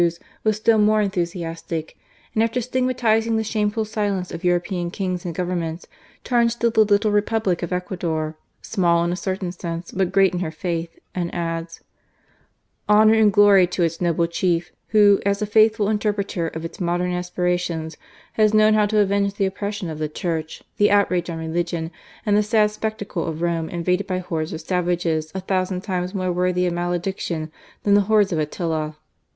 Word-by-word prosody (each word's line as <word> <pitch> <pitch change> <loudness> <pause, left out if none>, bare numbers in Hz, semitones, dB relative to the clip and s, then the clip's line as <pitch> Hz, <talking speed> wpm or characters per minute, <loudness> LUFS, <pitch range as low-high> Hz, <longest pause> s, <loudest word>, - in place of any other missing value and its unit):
was 215 -1 +2
still 220 0 +3
more 215 +1 +4
enthu 195 -3 0 0.2
itic; 165 -1 -5 0.4
and 220 - +2
after 230 +2 +1
stigmatizing 240 -3 +1
the 220 - 0
shameful 215 0 -1
silence 205 -4 -2
• 170 +1 -7
European 175 0 0
Kings 185 -1 -3
and 170 -2 -4
Governments, 175 -2 -3 0.4
turns 235 -1 +2
to 235 -1 +1
the 215 -2 +4
le - - +2
Republic 205 -3 +1
of 175 - -4
Ecuador, 170 -4 -2 0.3
"small 170 -3 +2
in 170 - 0
a - - -1
certain 185 0 -3
;nse, 170 -1 -6
but 190 -1 +1
great 195 -1 +4
in 175 - -2
her 175 -3 -2
faith," 165 +1 -4 0.2
and 175 -2 -2
adds: 165 -1 -4 1.1
"Honour 215 +1 +6
id 220 -2 +5
glory 200 -2 +6
to 180 0 -1
its 165 +1 -1
noble 170 -1 +2
Chief, 170 0 -1 0.2
who, 205 -2 +5
as 200 0 +1
a 210 - 0
faithftil 215 0 +3
erpreter 200 -5 -1
of 160 +1 -5
its 165 - -8
popular 175 0 0
aspirations, 180 -2 -2 0.4
has 215 -1 +3
known 215 0 +5
w 210 -1 +3
to 215 - -2
aven{;e 200 -1 +2
the 195 - +2
oppression 200 0 -3
of 155 - -7
the 155 -1 -2
Church, 160 0 -4
the 205 - +5
trage 185 -4 +2
on 165 - -5
religion, 165 0 -2 0.3
and 205 -2 +3
the 210 - +5
sad 210 0 +2
spectacle 215 -5 -4
of 160 +1 -4
Rome 165 -2 -1
vaded 180 +3 -1
by 185 - -1
hordes 165 -3 -3
of 160 - -5
savages 170 -2 -1
a 190 - -2
thousand 185 -1 -1
times 185 -1 -3
re 185 -1 -1
worthy 180 0 +1
of 175 - 0
malediction 175 -2 -3 0.3
than 200 - +3
the 205 - +6
hordes 210 -2 +4
of 160 - 0
,iila." 155 0 -2
180 Hz, 180 wpm, -22 LUFS, 170-210 Hz, 1.1 s, Honour